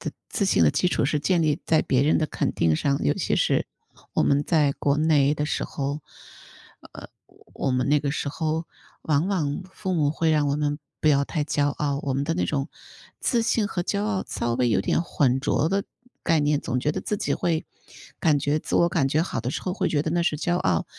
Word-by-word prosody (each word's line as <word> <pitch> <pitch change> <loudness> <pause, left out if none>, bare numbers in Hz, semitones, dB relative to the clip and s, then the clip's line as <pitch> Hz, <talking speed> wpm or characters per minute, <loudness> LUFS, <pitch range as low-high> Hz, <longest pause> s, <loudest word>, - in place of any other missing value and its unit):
的， - - -4 0.2
自 205 - -1
信 195 - +3
的 - - +6
基 180 - +1
础 - - 0
是 150 - 0
建 175 +3 +2
立 155 +1 +1
在 160 - +3
别 130 0 +1
人 150 +3 +3
的 155 - +1
肯 - - -2
定 80 -1 +2
上， 140 - 0
尤 75 - +2
其 - - -1
是 - - +1 0.5
我 - - +3
们 140 +1 +3
在 150 -3 +2
国 140 0 0
内 150 -2 +3
的 150 0 -2
时 - - -2
候， 140 +2 -3 0.9
呃， - - -10 0.5
我 135 - -1
们 125 +1 0
那 145 0 +4
个 140 -1 -1
时 140 - -2
候 160 +2 -2 0.4
往 155 +4 +1
往 155 -4 -1
父 190 -1 -3
母 145 -3 +2
会 160 +1 0
让 150 -2 +2
我 140 - 0
们 145 -1 -1 0.2
不 - - -2
要 140 -1 +4
太 150 0 -2
骄 145 -1 +1
傲， 145 -1 -2
我 140 - -1
们 140 +1 0
的 165 +3 -1
那 180 - 0
种 140 0 -2 0.5
自 240 - +1
信 225 -2 +1
和 185 - -3
骄 200 +2 -1
傲 210 -3 -1
稍 120 0 -2
微 125 0 +1
有 105 -4 +2
点 100 - +1
混 135 -6 +1
浊 145 +2 +1
的 195 +2 0 0.4
概 165 -3 +3
念， 145 0 +1
总 125 0 -2
觉 150 - +1
得 - - -3
自 210 - -2
己 - - -2
会， 165 -2 -1 0.6
感 155 -3 +3
觉 145 +2 +1
自 - - -5
我 170 - +4
感 165 -5 +1
觉 155 +3 +2
好 170 - -3
的 120 - -3
时 - - -4
候， 185 - -2
会 - - 0
觉 145 -2 +1
得 155 - -2
那 175 +1 +1
是 160 -3 0
骄 175 +3 0
傲。 90 - +1
150 Hz, 255 characters per minute, -25 LUFS, 140-165 Hz, 0.9 s, 的